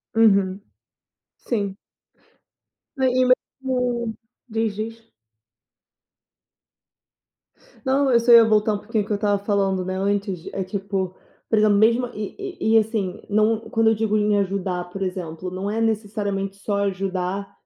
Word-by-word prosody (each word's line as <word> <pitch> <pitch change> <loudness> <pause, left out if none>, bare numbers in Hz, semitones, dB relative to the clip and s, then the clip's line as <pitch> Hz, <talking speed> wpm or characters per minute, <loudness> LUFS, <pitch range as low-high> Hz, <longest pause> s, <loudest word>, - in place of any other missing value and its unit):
Uhum. 200 -3 +3 0.8
Sim. 200 -5 -3 1.2
Né, 265 -1 +2
e 255 0 +3
mesmo 250 -2 0 0.4
diz, 220 -2 -1
diz. 225 +2 -6 2.8
Não, 270 +1 +2
eu 235 - +5
só 235 +1 +3
ia 230 -1 +10
voltar 215 0 +3
um - - -1
pouquinho 210 +1 -2
o - - -12
que 210 - -1
eu - - 0
tava 205 -1 +1
falando, 195 -2 +1
né, 185 0 -3
antes 195 -2 -1
é 195 - -2
tipo, 190 -1 -3 0.3
por 220 - +2
exemplo 210 -1 +4
mesmo 230 +4 +3
e 210 -1 -6 0.2
e 220 - +1
e - - +9
assim, 215 -3 -1
não 215 +1 +3
quando 225 0 +3
eu 225 - +3
digo 215 0 +1
em 210 -1 +2
ajudar 190 -2 -2
por 195 +2 -7
exemplo, 180 -2 -4
não 190 +2 -3
é 220 +2 -1
necessariamente 205 -3 -1
só 200 +1 -2
ajudar 195 0 -2
205 Hz, 145 wpm, -23 LUFS, 195-225 Hz, 2.8 s, ia